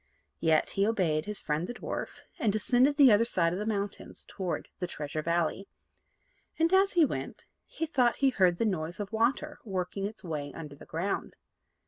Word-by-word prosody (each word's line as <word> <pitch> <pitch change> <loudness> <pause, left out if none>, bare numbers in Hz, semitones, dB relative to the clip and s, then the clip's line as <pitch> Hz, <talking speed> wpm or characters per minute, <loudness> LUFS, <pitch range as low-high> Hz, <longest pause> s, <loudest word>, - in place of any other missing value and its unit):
Yet 160 -1 +3
he 195 +1 +1
obeyed 165 -8 +1
his 210 -2 -1
friend 155 +4 -1
the 245 - -6
dwarf, - - -5 0.2
and 220 - +2
descended 250 +7 +3
the 275 -5 +8
other 210 +2 +5
side 170 -7 +1
of 180 - -3
the 210 - -3
mountains 205 -2 -4
toward 185 -4 -4
the 180 - -2
Treasure 155 -2 -4
Valley; 170 +4 0 0.9
and, 330 +3 +2
as 390 +1 +5
he 340 -4 +6
went, - - -5 0.2
he 325 - -3
thought 255 -6 +2
he 275 -1 +3
heard 185 -6 +3
the 230 - +1
noise 175 -4 -2
of 205 -1 -4
water 255 +7 0
working 195 -1 -3
its 215 0 -10
way 150 -4 -4
under 150 -3 -8
the - - -14
ground. 175 +5 -3
200 Hz, 185 wpm, -29 LUFS, 170-240 Hz, 0.9 s, the